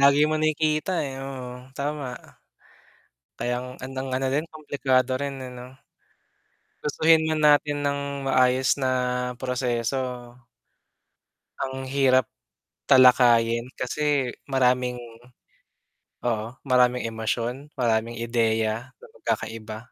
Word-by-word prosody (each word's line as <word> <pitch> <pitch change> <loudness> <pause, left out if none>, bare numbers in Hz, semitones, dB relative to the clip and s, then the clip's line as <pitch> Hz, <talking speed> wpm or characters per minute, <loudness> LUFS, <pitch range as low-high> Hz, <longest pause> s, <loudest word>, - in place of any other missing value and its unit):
Lagi 140 +2 +6
mo 155 0 0
nakikita, 155 +2 +1
eh, 135 -1 -6
oo 130 -2 -8
tama. 140 -3 -5 1.0
Kayang 125 +1 -2 0.2
andang 130 0 -5
ano 130 +1 0
din 150 +3 +1
komplikado 135 -4 0
rin, 140 -1 -3
eh, 125 - -7
'no? 125 +2 -12 1.0
Gustuhin 160 +2 +4
man 155 - 0
natin 145 0 +4
nang 140 -1 -3
maayos 130 0 +3
na 130 -2 -1 0.5
proseso. 125 -1 -2 1.3
Ang 130 0 -3
hirap 130 -2 +3 0.6
talakayin 120 -2 +5
kasi 140 0 0 0.2
maraming 125 -2 +2 1.3
oo 110 -2 0 0.2
maraming 125 -2 +3
emosyon, 115 +5 -3
maraming 115 -1 0
ideya 115 0 0
na - - -15
magkakaiba. 110 -1 -4
130 Hz, 100 wpm, -25 LUFS, 120-140 Hz, 1.3 s, Lagi